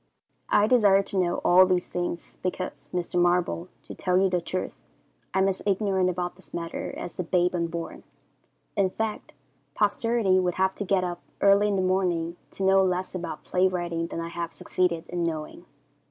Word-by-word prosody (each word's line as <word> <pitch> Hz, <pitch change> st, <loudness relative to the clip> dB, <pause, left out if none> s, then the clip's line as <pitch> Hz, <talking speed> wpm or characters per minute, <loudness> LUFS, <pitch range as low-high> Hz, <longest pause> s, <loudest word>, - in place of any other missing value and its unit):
I 205 Hz, -, +5 dB
desire 205 Hz, -4 st, +5 dB
to 195 Hz, -, -5 dB
know 175 Hz, -1 st, +1 dB
all 185 Hz, +1 st, +7 dB
these 180 Hz, -1 st, +1 dB
things, 175 Hz, -1 st, -4 dB
because, 180 Hz, -6 st, -4 dB
Mr. 180 Hz, 0 st, 0 dB
Marble, 175 Hz, 0 st, +1 dB, 0.2 s
to -, -, -9 dB
tell 180 Hz, -1 st, 0 dB
you 190 Hz, 0 st, +3 dB
the 180 Hz, -1 st, +1 dB
truth, 185 Hz, +2 st, -3 dB, 0.6 s
I -, -, -2 dB
am 190 Hz, 0 st, +4 dB
as 190 Hz, -1 st, -1 dB
ignorant 195 Hz, -2 st, +1 dB
about 180 Hz, 0 st, -3 dB
this 190 Hz, -, -11 dB
matter 170 Hz, -1 st, -4 dB
as 175 Hz, -, -7 dB
the 180 Hz, -, -1 dB
babe 180 Hz, +1 st, +1 dB
unborn. 170 Hz, -1 st, -3 dB, 0.7 s
In 200 Hz, -3 st, +2 dB
fact, 220 Hz, +2 st, -4 dB, 0.4 s
posterity 210 Hz, -2 st, +2 dB
would 180 Hz, -1 st, 0 dB
have 190 Hz, 0 st, +2 dB
to 205 Hz, -, -3 dB
get 190 Hz, -1 st, +2 dB
up 175 Hz, -1 st, -4 dB, 0.2 s
early 200 Hz, +1 st, +5 dB
in 205 Hz, -, +1 dB
the 190 Hz, -, +1 dB
morning 180 Hz, -3 st, 0 dB
to 195 Hz, -, -6 dB
know 190 Hz, 0 st, +5 dB
less 185 Hz, 0 st, -1 dB
about 180 Hz, -2 st, -5 dB
play 185 Hz, +1 st, +2 dB
writing 170 Hz, -2 st, -2 dB
than 165 Hz, -, -5 dB
I 165 Hz, 0 st, -4 dB
have 170 Hz, -1 st, -5 dB
succeeded 175 Hz, -2 st, -1 dB
in 175 Hz, -1 st, -2 dB
knowing. 155 Hz, -2 st, -4 dB
180 Hz, 185 wpm, -26 LUFS, 175-190 Hz, 0.7 s, all